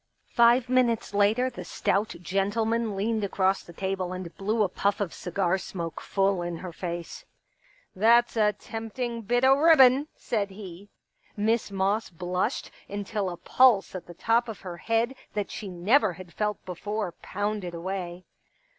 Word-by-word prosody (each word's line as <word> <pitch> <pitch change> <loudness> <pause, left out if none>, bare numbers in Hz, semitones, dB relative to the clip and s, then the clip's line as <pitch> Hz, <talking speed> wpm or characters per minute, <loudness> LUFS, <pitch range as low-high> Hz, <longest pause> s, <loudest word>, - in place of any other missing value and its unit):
Five 235 +1 +5
minutes 245 -4 +1
later 210 +5 +3
the - - -7
stout 205 +1 -1
gentleman 220 +4 0
leaned 215 +2 0
across 195 -1 +1
the - - -13
table 190 0 -3
and 185 -2 -7
blew 215 +3 +1
a - - +2
puff 200 +2 0
of 200 -5 -2
cigar 185 +1 -1
smoke 170 -3 -5
full 195 -2 +1
in 175 -1 -3
her 180 0 -7
face. 170 -1 -5 0.4
" - - -36 0.3
That's 235 +5 +4
a 210 -2 +3
tempting 230 +3 -5
bit 245 +4 +1
o* 265 - +7
ribbon! 285 -2 +6
" - - -45
said 205 -4 -2
he. 195 -1 -10 0.5
Miss 220 +2 +1
Moss 200 +3 0
blushed 180 +1 -2 0.2
until 205 -1 -2
a 175 - -6
pulse 245 -3 +4
at 185 - -7
the 175 - -11
top 230 +5 +2
of 220 - -7
her 175 -2 -7
head 230 +6 0 0.2
that 205 -1 -2
she 205 - -6
never 195 +4 +3
had 175 0 -12
felt 210 -1 -2
before 205 +2 -3
pounded 205 -3 -3
away. 180 0 -5
205 Hz, 165 wpm, -27 LUFS, 185-225 Hz, 0.5 s, o